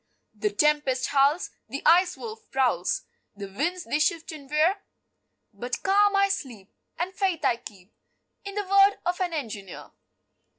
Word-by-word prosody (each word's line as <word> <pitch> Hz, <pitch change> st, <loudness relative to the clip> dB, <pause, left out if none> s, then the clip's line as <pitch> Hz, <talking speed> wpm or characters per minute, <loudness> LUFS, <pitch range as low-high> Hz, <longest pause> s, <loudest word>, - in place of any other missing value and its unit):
The 210 Hz, -1 st, -1 dB
tempest 260 Hz, +2 st, +1 dB
howls, 285 Hz, +5 st, +2 dB, 0.2 s
The 275 Hz, +4 st, -5 dB
Ice 360 Hz, +3 st, +5 dB
Wolf 445 Hz, -1 st, -9 dB
prowls, 245 Hz, -10 st, 0 dB, 0.3 s
The 200 Hz, 0 st, -6 dB
winds 340 Hz, -, -2 dB
they 295 Hz, -, -1 dB
shift 325 Hz, +2 st, 0 dB
and 285 Hz, -4 st, -11 dB
veer, 315 Hz, +7 st, +3 dB, 0.8 s
But 240 Hz, +5 st, -5 dB
calm 405 Hz, +1 st, +4 dB
I 395 Hz, 0 st, +4 dB
sleep, 255 Hz, -, -5 dB, 0.2 s
And 360 Hz, +2 st, -3 dB
faith 365 Hz, -5 st, -1 dB
I 240 Hz, -3 st, +3 dB
keep 200 Hz, -3 st, -13 dB, 0.5 s
In 400 Hz, 0 st, -7 dB
the 415 Hz, -1 st, -2 dB
word 395 Hz, +1 st, +5 dB
of 355 Hz, +2 st, -1 dB
an 360 Hz, -2 st, 0 dB
engineer. 220 Hz, -, -6 dB
305 Hz, 155 wpm, -26 LUFS, 250-380 Hz, 0.8 s, Ice